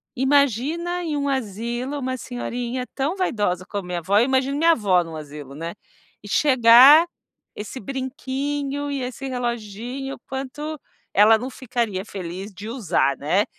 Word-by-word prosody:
“Imagina 285 +7 +1
em 305 -3 -2
um 285 - -1
asilo 240 +3 -3
uma 260 -1 -2
senhorinha 245 0 -4
tão 285 +7 -1
vaidosa 205 - 0
como 200 -3 -5
minha 175 -1 -2
avó”, 195 +4 +1
eu 235 - +4
imagino 265 +1 +1
minha 335 +2 +5
avó 190 - +2
num 165 -1 -9
asilo, 145 -2 -9
né, 165 +3 -5 0.5
e 205 - -10
chegar 265 - +7 0.5
esse 215 +5 -6
brinquinho 275 +3 -3
e 275 -2 -2
esse 255 +2 -5
reloginho, 245 +1 -4
o - - -19
quanto 285 +3 -5 0.3
ela 215 +2 +6
não 250 +4 -5
ficaria 235 -7 -3
feliz 190 0 -7
de 200 +4 -8
usar, 175 - +1
né. 180 +8 +1
245 Hz, 150 wpm, -23 LUFS, 205-275 Hz, 0.5 s, chegar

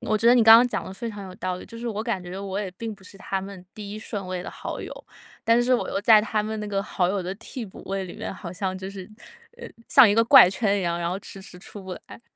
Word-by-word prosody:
我 215 -3 0
觉 230 - +1
得 240 - +8
你 240 - +5
刚 225 0 +10
刚 245 - +5
讲 - - -3
得 - - -8
非 230 +4 -5
常 205 -2 -8
有 185 -1 -10
道 185 -1 -3
理。 - - -10
就 230 - -11
是 235 - -4
我 215 -1 -3
感 225 -6 -2
觉 180 +2 -7
我 195 0 -4
也 195 -3 -4
并 220 +4 -6
不 195 - -16
是 195 - -11
他 195 0 -3
们 195 -2 -9
第 205 -2 -8
1 215 - -6
顺 205 -2 -5
位 185 -1 -4
的 - - -7
好 - - -6
友， - - -7 0.5
但 230 +1 +4
是 255 - +1
我 - - -1
又 - - -1
在 220 -1 +7
他 215 0 -1
们 220 +1 -4
那 210 - -4
个 200 -1 -1
好 185 -3 -1
友 195 0 -1
的 185 +2 -4
替 235 +3 -7
补 190 - -12
位 195 0 -3
里 180 - -9
面， - - -5
好 175 -2 -8
像 185 0 -3
就 190 +1 -7
是 195 0 -9 0.5
呃， 480 - -9 0.2
像 265 -5 +8
一 205 - +3
个 230 - +5
怪 205 - +9
圈 200 +1 +1
一 - - -2
样， 170 -1 -1
然 170 0 -2
后 185 +2 -3
迟 195 0 -10
迟 185 -1 -11
出 200 +2 -10
不 190 -1 -7
来。 - - -13
200 Hz, 325 characters per minute, -24 LUFS, 185-220 Hz, 0.5 s, 刚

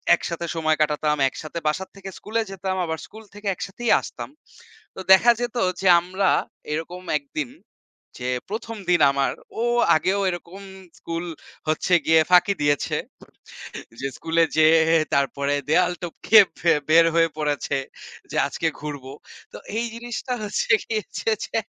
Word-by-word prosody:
একসাথে 170 0 -5
সময় 155 -1 +1
কাটাতাম, 150 0 +1
একসাথে 155 +4 -7
বাসার 185 +5 -1
থেকে 195 0 -8
স্কুলে 225 +2 -2
যেতাম। 190 0 -3
আবার 160 -1 -3
স্কুল 220 +1 -13
থেকে 205 0 -8
একসাথেই 225 +6 -3
আসতাম। - - -8 0.7
তো - - -9
দেখা 225 +6 +6
যেত 245 0 -3 0.3
যে 195 - +1
আমরা 185 +2 0 0.4
এরকম 165 +4 -5 0.2
একদিন 140 -1 -5 0.7
যে 125 0 -3 0.2
১ম 225 +1 -5
দিন 175 - +4
আমার, 140 0 0 0.3
ও - - +1 0.3
আগেও 190 +5 +1
এরকম 175 +2 -7 0.4
স্কুল 165 +1 -4 0.4
হচ্ছে 155 +3 0
গিয়ে 160 0 +5
ফাঁকি 180 +3 +5
দিয়েছে। 145 -1 +1 1.0
যে 135 - -1
স্কুলে 165 +1 +1
যেয়ে 160 +1 +6 0.3
তারপরে 140 +1 0
দেওয়াল 180 +3 +3
টপকে 175 +5 +4 0.2
বে 170 - +5 0.2
বের 165 +1 +7
হয়ে 165 0 +4
পড়েছে 145 -2 -1 0.5
যে, - - -6
"আজকে - - -2
ঘুরবো।" 145 -3 -7 0.4
তো - - -7 0.2
এই 235 - 0
জিনিসটা 240 +2 -5
হচ্ছে 210 0 -2
গিয়ে 220 -1 -2
হচ্ছে - - -4 0.2
যে - - -3
170 Hz, 145 wpm, -23 LUFS, 155-195 Hz, 1.0 s, বের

